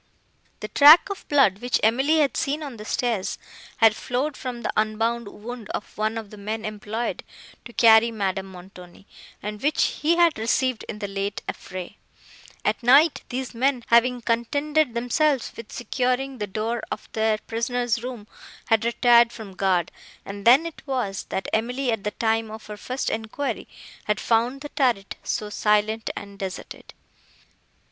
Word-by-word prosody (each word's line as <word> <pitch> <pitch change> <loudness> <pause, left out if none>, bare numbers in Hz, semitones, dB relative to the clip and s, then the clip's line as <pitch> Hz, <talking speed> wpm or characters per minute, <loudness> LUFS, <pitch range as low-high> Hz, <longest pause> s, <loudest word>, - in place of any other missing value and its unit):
The 215 - -4
track 300 - +8
of 395 - -7
blood, 260 -10 +4
which 245 +1 0
Emily 265 +8 +3
had 280 -5 +1
seen 295 +2 -1
on 275 -5 -7
the 210 - -9
stairs, 225 -5 -1 0.4
had 225 -3 +5
flowed 260 +6 -2
from 245 -2 -6
the - - -2
unbound 225 +2 0
wound 225 +2 -9
of - - -7
one 215 +1 -1
of 220 -3 -7
the 210 - -11
men 215 +2 -4
employed 215 +2 -4 0.4
to 235 - -9
carry 225 0 +6
Madame 195 -3 -2
Montoni, 180 0 -13 0.4
and 210 +1 -5
which 295 +2 0 0.2
he 320 +3 +3
had 340 -6 +3
received 240 +2 0
in 215 - -5
the 205 -1 -4
late 195 0 -4
affray. 185 +2 -7 0.7
At - - 0
night 280 +6 +5
these 255 0 -4
men, 255 +1 +1
having 245 +1 +4
contented 285 +4 0
themselves 255 +3 +1
with 230 -2 -10
securing 255 +1 -2
the 210 - -2
door 220 +4 -2
of - - -6
their 220 -1 +1
prisoner's 235 +1 -2
room, 245 -4 -6 0.4
had 225 -1 +3
retired 235 0 +5
from 220 -4 -9
guard; 185 -3 +1 0.3
and 200 0 -8
then 265 +7 +7
it 335 - -7
was, 240 -8 -2
that 190 - -4
Emily, 245 +3 0
at 220 -3 -2
the 210 - 0
time 225 +1 0
of 220 0 -9
her 210 - -7
first 255 +5 -3
enquiry, 225 +3 -3 0.4
had 210 0 0
found 240 +4 +1
the 295 - -7
turret 240 -10 0
so 210 -1 -3
silent 210 +1 +1
and 200 -1 -9
deserted. 190 -2 -7
230 Hz, 165 wpm, -24 LUFS, 210-255 Hz, 0.7 s, track